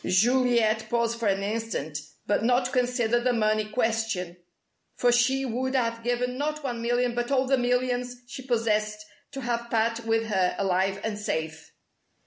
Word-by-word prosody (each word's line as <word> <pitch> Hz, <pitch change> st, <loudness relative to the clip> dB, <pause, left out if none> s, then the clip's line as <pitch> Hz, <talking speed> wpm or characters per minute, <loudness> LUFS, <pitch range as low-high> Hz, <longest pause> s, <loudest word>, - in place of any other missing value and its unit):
Juliet 230 Hz, +1 st, +2 dB
paused 235 Hz, -1 st, 0 dB
for 230 Hz, -, 0 dB
an 195 Hz, 0 st, +1 dB
instant, 210 Hz, -8 st, -3 dB, 0.3 s
but 205 Hz, +1 st, +1 dB
not 250 Hz, +2 st, +3 dB
to 250 Hz, -, -2 dB
consider 245 Hz, -2 st, +1 dB
the 245 Hz, +1 st, +1 dB
money 215 Hz, -1 st, +1 dB
question, 225 Hz, -6 st, -1 dB, 0.6 s
for 245 Hz, -, +3 dB
she 260 Hz, +3 st, +2 dB
would 260 Hz, +2 st, -2 dB
have 230 Hz, -2 st, 0 dB
given 250 Hz, +1 st, -1 dB
not 305 Hz, +1 st, -2 dB
one 240 Hz, -4 st, -3 dB
million 240 Hz, +1 st, +1 dB
but 240 Hz, 0 st, -2 dB
all 265 Hz, -1 st, +2 dB
the 270 Hz, +1 st, +3 dB
millions 245 Hz, 0 st, 0 dB
she 245 Hz, -, -8 dB
possessed 215 Hz, -4 st, 0 dB, 0.3 s
to 270 Hz, -, -6 dB
have 235 Hz, -1 st, -2 dB
Pat 230 Hz, 0 st, +1 dB
with 225 Hz, 0 st, +1 dB
her, 190 Hz, -4 st, +1 dB
alive 195 Hz, 0 st, +1 dB
and 215 Hz, -2 st, -3 dB
safe. 160 Hz, -5 st, -4 dB
235 Hz, 165 wpm, -26 LUFS, 215-250 Hz, 0.6 s, not